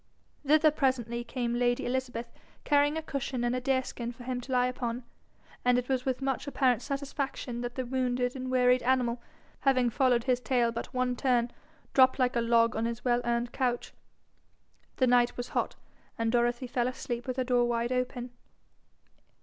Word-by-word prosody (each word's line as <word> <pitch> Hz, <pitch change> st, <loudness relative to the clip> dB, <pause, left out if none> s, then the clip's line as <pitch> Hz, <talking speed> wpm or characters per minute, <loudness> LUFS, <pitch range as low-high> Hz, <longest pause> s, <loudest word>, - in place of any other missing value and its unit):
Thither 305 Hz, +2 st, +5 dB
presently 245 Hz, -5 st, 0 dB
came 240 Hz, -1 st, -2 dB
lady 245 Hz, 0 st, +1 dB
Elizabeth, 245 Hz, -2 st, -3 dB, 0.3 s
carrying 290 Hz, +1 st, +3 dB
a 320 Hz, -, -3 dB
cushion 265 Hz, -4 st, -3 dB
and 240 Hz, +1 st, +1 dB
a 255 Hz, -, -2 dB
deerskin 255 Hz, -2 st, -1 dB
for 245 Hz, 0 st, -12 dB
him 250 Hz, 0 st, -3 dB
to 260 Hz, -, -9 dB
lie 250 Hz, -1 st, +3 dB
upon, 245 Hz, -1 st, -3 dB, 0.6 s
and 250 Hz, 0 st, +4 dB
it 250 Hz, +1 st, -2 dB
was 260 Hz, -2 st, 0 dB
with 260 Hz, +1 st, -1 dB
much 270 Hz, +1 st, -1 dB
apparent 255 Hz, -4 st, +2 dB
satisfaction 275 Hz, -3 st, -4 dB
that 245 Hz, 0 st, -5 dB
the 260 Hz, -, -2 dB
wounded 250 Hz, 0 st, -1 dB
and 255 Hz, -1 st, -4 dB
wearied 250 Hz, 0 st, +4 dB
animal, 245 Hz, -1 st, +1 dB, 0.4 s
having 255 Hz, -3 st, +2 dB
followed 245 Hz, -1 st, +2 dB
his 250 Hz, -1 st, +1 dB
tail 245 Hz, -2 st, +1 dB
but 235 Hz, +1 st, -5 dB
one 255 Hz, -1 st, 0 dB
turn, 245 Hz, -2 st, +1 dB, 0.4 s
dropped 260 Hz, -1 st, +5 dB
like 250 Hz, -2 st, +1 dB
a 235 Hz, -, +2 dB
log 230 Hz, -1 st, +3 dB
on 220 Hz, +1 st, 0 dB
his 235 Hz, +1 st, -4 dB
well 240 Hz, -1 st, +3 dB
earned 240 Hz, 0 st, 0 dB
couch. 245 Hz, -2 st, -1 dB, 1.0 s
The 260 Hz, -, +4 dB
night 245 Hz, -1 st, +3 dB
was 245 Hz, 0 st, -4 dB
hot, -, -, -1 dB, 0.4 s
and 225 Hz, 0 st, 0 dB
Dorothy 240 Hz, +1 st, +1 dB
fell 245 Hz, -1 st, 0 dB
asleep 245 Hz, -1 st, -4 dB
with 255 Hz, 0 st, -3 dB
her 260 Hz, -, +1 dB
door 245 Hz, -1 st, +2 dB
wide 235 Hz, 0 st, -1 dB
open. 250 Hz, -1 st, -2 dB
250 Hz, 180 wpm, -29 LUFS, 240-260 Hz, 1.0 s, Thither